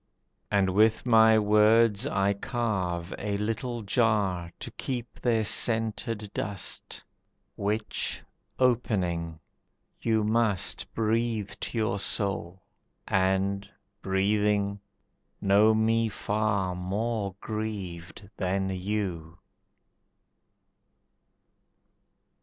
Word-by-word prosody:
And 95 -2 +2
with 110 +5 +3
my 110 -2 +6
words 105 +2 +4
I 100 -6 +1
carve 95 -6 -2
a 100 -1 -2
little 115 +3 -3
jar 100 -6 +1
To - - -7
keep 120 -4 -5
their 115 -3 +1
scented 110 -1 0
dust, 100 -1 -2 0.5
Which, 105 +2 -2 0.3
opening, 90 -10 0 0.6
you 110 -2 +1
must 110 -3 0
Breathe 110 -1 0
to - - -5
your 110 -3 0
soul, 95 -3 -1 0.4
and, 95 +1 +1 0.3
breathing, 100 +1 +1 0.6
know 105 +3 +4
me 115 +1 +2
far 100 -3 -1
More 100 +2 -2
grieved 100 -5 -6
than 95 +1 -1
you. 90 -4 -3
105 Hz, 85 wpm, -28 LUFS, 95-110 Hz, 0.6 s, my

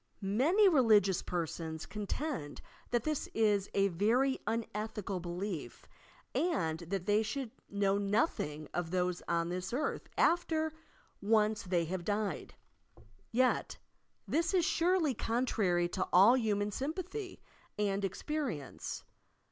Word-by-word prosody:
Many 290 - +4
religious 215 - +5
persons 165 -2 -4
contend 210 - -4 0.3
that 240 -2 +1
this 305 0 -2
i 210 -2 +4 0.2
a 195 0 +4
very 235 +9 +2
unethical 210 -3 -3
belief 175 0 -5 0.5
and 175 - 0
that 180 +1 -4
they 205 +2 +3
should 230 +2 -3 0.2
know 200 0 +1
noth 205 +9 +1
ing 150 0 -4
of 175 -2 -2
those 180 0 0
on 170 0 0
this 180 +1 -3
earth 265 +6 -2
after 320 -2 +2 0.5
ouce 215 0 +3
they 175 -2 +1
have 180 +1 -3
died. 205 +1 -2 0.8
Yet, 255 +2 +1 0.5
this 335 +4 +1
is 350 -3 +3
surely 345 -5 +2
contrarj 210 -8 0
to 185 - -1
all 200 +7 +7
human 210 -4 0
sympathy 365 - -4 0.4
and 200 -1 0
experience. 225 - -3
210 Hz, 120 wpm, -33 LUFS, 180-265 Hz, 0.8 s, all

